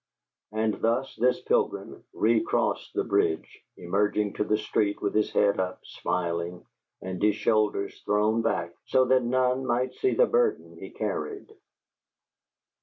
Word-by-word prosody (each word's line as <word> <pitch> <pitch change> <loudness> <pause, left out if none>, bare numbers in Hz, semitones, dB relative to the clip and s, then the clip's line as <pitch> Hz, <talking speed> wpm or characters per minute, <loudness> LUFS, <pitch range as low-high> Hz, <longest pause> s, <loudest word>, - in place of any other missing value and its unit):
And 110 0 -1
thus 120 +4 0
this 125 +2 +2
pilgrim - - -1
recrossed 110 +1 +1
the - - +1
bridge, 80 - 0 0.2
emerging 105 +3 0
to - - -1
the 105 0 +1
street 105 -1 0
with 100 - -1
his 110 - +2
head 100 -1 +2
up, 95 0 -3
smiling, 85 0 -3 0.4
and 95 -1 -5
his 105 0 +3
shoulders 105 -2 0
thrown 105 +2 +2
back 85 -6 -1
so 130 - +4
that 130 0 +4
none 130 +1 +1
might 125 0 0
see 390 - 0
the - - +5
burden 470 -3 0
he - - -8
carried. 420 0 -4
110 Hz, 140 wpm, -27 LUFS, 100-125 Hz, 0.4 s, the